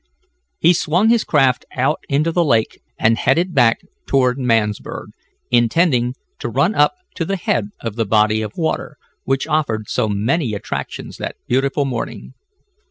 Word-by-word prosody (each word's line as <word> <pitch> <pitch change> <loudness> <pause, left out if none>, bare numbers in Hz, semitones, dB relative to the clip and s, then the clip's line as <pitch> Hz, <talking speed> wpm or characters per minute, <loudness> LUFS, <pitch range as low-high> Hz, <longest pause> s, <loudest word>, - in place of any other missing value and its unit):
He 170 - +4
swung 175 +6 +2
his 235 -1 +3
craft 135 -5 +2
out 135 +4 +1
into 150 +4 +1
the 175 +1 +2
lake, 115 -8 +1 0.2
and 115 +1 +2
headed 170 +7 +1
back 120 -5 +3 0.3
toward 130 -1 +2
Mansburg, 115 -5 -1 0.4
intending 125 +1 +2 0.2
to - - -3
run 140 - +1
up 150 - +3 0.2
to 165 - -3
the 195 +4 -2
head 115 - 0
of 115 -1 -5
the 115 - +1
body 105 +1 +2
of 105 -1 -6
water, 160 -2 -2 0.3
which 135 0 0
offered 145 -9 -1
so 110 - 0
many 115 +4 0
attractions 100 - -6
that - - -5
beautiful 135 +3 +1
morning. 125 -4 -5
130 Hz, 155 wpm, -19 LUFS, 115-155 Hz, 0.4 s, He